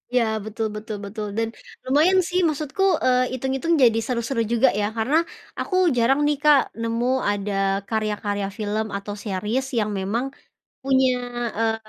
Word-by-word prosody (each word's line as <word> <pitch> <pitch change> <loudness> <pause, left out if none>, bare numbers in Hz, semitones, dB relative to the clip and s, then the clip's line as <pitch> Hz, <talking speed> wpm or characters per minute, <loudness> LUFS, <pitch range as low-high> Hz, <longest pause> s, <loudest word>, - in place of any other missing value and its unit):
Ya, 245 - +5 0.2
betul 220 0 -2
betul 215 0 -5
betul, 210 +1 -5
dan 225 0 -1 0.3
lumayan 315 +8 +4
sih 360 +2 -1
maksudku, 305 +4 -2 0.2
eee, 255 0 +2
itung-itung 270 +6 -1
jadi 225 -2 +5
seru-seru 235 +1 -2
juga 235 +3 +3
ya, 205 +1 0
karena 250 +8 +2 0.4
aku 370 - -2 0.2
jarang 260 +4 +3
nih 295 -1 +2
Kak 295 -2 +5
nemu 230 +1 -1 0.3
ada 205 0 -3 0.4
karya-karya 210 -2 -1
film 215 +1 -1
atau 200 +1 -6
series 215 +6 -2
yang 215 -2 +1
memang 220 +7 -1 0.6
punya, 265 -1 +3 0.4
eee, 225 0 +1
230 Hz, 145 wpm, -23 LUFS, 215-265 Hz, 0.6 s, Ya